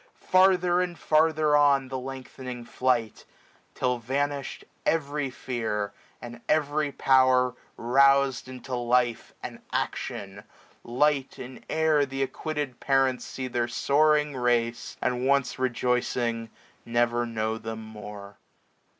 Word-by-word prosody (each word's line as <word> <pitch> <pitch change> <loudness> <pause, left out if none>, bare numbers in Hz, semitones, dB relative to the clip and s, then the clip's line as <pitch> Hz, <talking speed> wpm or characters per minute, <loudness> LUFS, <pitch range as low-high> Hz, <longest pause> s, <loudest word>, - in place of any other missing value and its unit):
Farther 185 -1 +3
and 175 -2 -3
farther 155 -1 +3
on, 140 -2 +4
the 130 0 -3
lengthening 130 -1 -7
flight; 120 -2 -1 0.5
Till 125 -1 0
vanished 140 +3 -3 0.2
every 145 -3 0
fear, 110 -5 -3 0.3
and 120 -1 -9
every 150 -1 +1
power 130 -2 +3 0.2
RouzM 135 +2 +3
into 130 0 -8
life 120 -1 0
and - - -7
action, 100 0 -4 0.4
light 135 +3 +1
in 125 0 -9
air 160 -2 +3
Th' 135 0 -2
acquitted 145 -2 -4
parents 135 -2 +1
see 130 -1 -5
their 120 -1 -1
soaring 150 +3 +2
race, 120 -2 0
750 - - -4
And 130 - -1
once 140 -2 +1
rejoicing 120 -2 -1 0.3
never 120 0 +1
know 110 -1 -2
them 110 0 -6
more. 105 -2 -10
130 Hz, 115 wpm, -27 LUFS, 120-145 Hz, 0.5 s, on